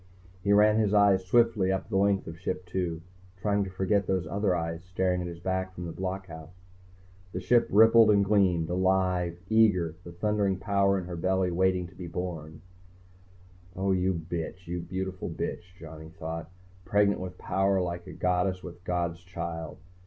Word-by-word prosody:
He 100 - +1
ran 105 +1 +5
his 105 -1 +2
eyes 100 -2 +5
swiftly 105 -1 +3
up 95 - -2
the - - -4
length 100 0 +2
of 80 0 -9
Ship 90 0 -4
II, 85 -3 -2 0.3
trying 100 +1 +1
to - - -6
forget 95 +1 0
those 95 -2 0
other 100 -2 0
eyes 85 0 -3
staring 90 0 -1
at 90 - -4
his 85 -1 -8
back 95 +1 -2
from 90 - -6
the 85 - -5
blockhouse. 90 -3 -6 0.8
The 90 - -2
Ship 120 +6 +3
rippled 115 +1 +7
and 100 -1 +4
gleamed, 95 -5 +2
alive, 90 -1 +1
eager, 100 -7 +3
the 85 - -9
thundering 100 +1 0
power 100 0 +2
in 95 - -4
her 90 0 -6
belly 95 +1 0
waiting 90 0 +1
to 85 - -13
be 90 -1 -7
born. 80 -3 -6 1.1
Oh, 95 +1 0
you 95 0 +1
bitch! 85 +2 -5
You 85 +1 -4
beautiful 95 +1 -4
bitch, 90 +1 -5
Johnny 80 -1 -10
thought. 80 0 -6 0.3
_Pregnant 100 +2 +2
with 90 -1 -7
power 95 0 +1
like 85 -1 -3
a - - -7
goddess 90 +1 0
with 85 -2 -8
a 90 - -28
god's 85 -1 -1
child. 85 -2 -6
95 Hz, 175 wpm, -28 LUFS, 85-100 Hz, 1.1 s, rippled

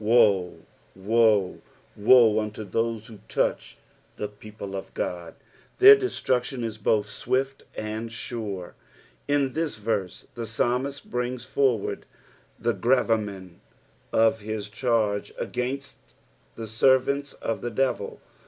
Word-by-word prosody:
Woe, 105 -5 +3 0.3
woe, 105 -1 +2 0.3
woe, 110 0 +6
unto 110 0 -4
those 115 +2 -2
vlio 110 -3 -12
touch - - -1 0.4
tlie 105 0 -4
people 105 -2 -8
of 95 - -7
Ood; 85 -2 -4 0.4
their 410 +2 +10
destruction 130 - -1
is 110 -1 -4
both 105 0 +2
swift 130 +6 -2
and 110 +1 -4
sure. 105 -6 -5 0.6
7. 145 0 +3
In 130 -2 -2
this 160 -7 -2
verse 105 -4 -3
tbe 115 - -4
psainiist 125 +5 -1
brings 125 0 -3
forward 130 -5 0 0.5
the - - 0
gravamen 105 -7 0 0.5
of 110 0 +3
his 105 -1 -5
cha^e 110 -3 0 0.2
■gainst 135 +3 -3 0.6
the 115 - -6
servants 130 +5 +2
of 115 - -4
the 120 - -2
devit. 130 +3 -1
115 Hz, 120 wpm, -26 LUFS, 105-125 Hz, 0.6 s, their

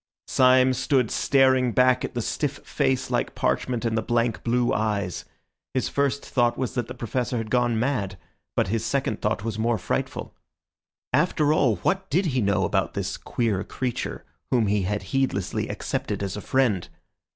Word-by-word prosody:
Syme 130 0 +5
stood 130 -2 +1
staring 130 -3 +3
back 130 0 +4
at - - -4
the 120 - -1
stiff 145 +4 -1
face 130 -3 0
like - - -1
parchment 125 -2 0
and 115 -1 0
the 110 - +1
blank, 115 0 0
blue 120 +1 +1
eyes. 105 -4 -1 0.5
His 130 - 0
first 140 0 0
thought 120 -2 +1
was 130 - -2
that 120 -3 -2
the 125 - -7
Professor 120 +1 -2
had 110 -1 -4
gone 120 -2 +2
mad, 110 -7 -1 0.4
but - - +1
his 115 +1 0
second 115 -2 -1
thought 105 0 0
was 110 -1 -3
more 115 +1 +1
frightful. - - -3 0.8
After 150 0 +3
all, 125 -8 +3
what 190 0 0
did 180 +7 +2
he 125 - +2
know 100 -1 +2
about - - 0
this - - -2
queer 110 -5 -1
creature 125 -2 -4 0.2
whom 120 -3 +3
he 100 0 +1
had 100 +1 -2
heedlessly 130 -8 0
accepted - - -3
as 95 -1 -3
a 105 - -5
friend? 120 -9 +1
120 Hz, 175 wpm, -25 LUFS, 110-130 Hz, 0.8 s, Syme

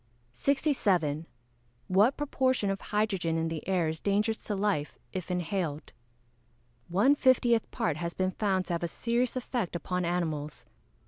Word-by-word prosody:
67. 185 - +1 0.6
What 205 +8 +4
proportion 260 -7 +1
of 195 - -4
hydrogen 195 -6 0
in 165 0 0
the 160 0 -5
air 180 -4 +2
is 160 0 -3
dangerous 210 +4 0
to 210 - -2
life, 195 -7 -1 0.2
if 185 -2 -4
inhaled? 180 -4 -2 0.9
One 205 +11 +4
fiftieth 245 -4 +3
part 220 -11 -1
has 170 +1 -4
been 185 0 0
found 190 -2 0
to 175 - -3
have 170 - -1
a - - +1
serious 235 +7 -1
effect 245 -7 -2
upon 180 +2 -2
animals. 160 -4 -2
190 Hz, 145 wpm, -29 LUFS, 170-225 Hz, 0.9 s, What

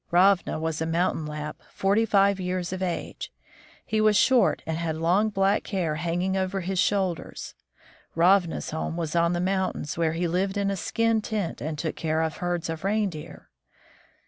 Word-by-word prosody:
Ravna 180 -1 +3
was 160 -1 -2
a 160 - 0
mountain 165 -2 0
Lapp, 150 0 -6
forty 200 +4 +2
five 200 -1 +3
years 180 -1 -2
of 185 - -5
age. 180 -2 -4 0.5
He 220 -1 0
was 215 -1 +4
short, 255 +1 +3
and 160 - -2
had 165 -2 -2
long, 180 +7 +2
black 195 0 +1
hair 180 -7 -1
hanging 175 +4 -1
over 190 0 -1
his 185 +1 -2
shoulders. 195 -4 -1 0.6
Ravna's 175 0 +3
home 160 +1 -3
was 165 -1 -3
on 170 0 +3
the 175 - -1
mountains, 185 -4 -1
where 160 -1 +2
he 170 +1 -1
lived 190 +4 0
in 200 0 +1
a - - -1
skin 230 +4 +1
tent 210 -6 -3
and 155 +1 -3
took 160 +1 -3
care 160 0 0
of 160 -1 -3
herds 175 -1 -2
of 165 0 -5
reindeer. 195 -6 -3
180 Hz, 175 wpm, -26 LUFS, 165-195 Hz, 0.6 s, was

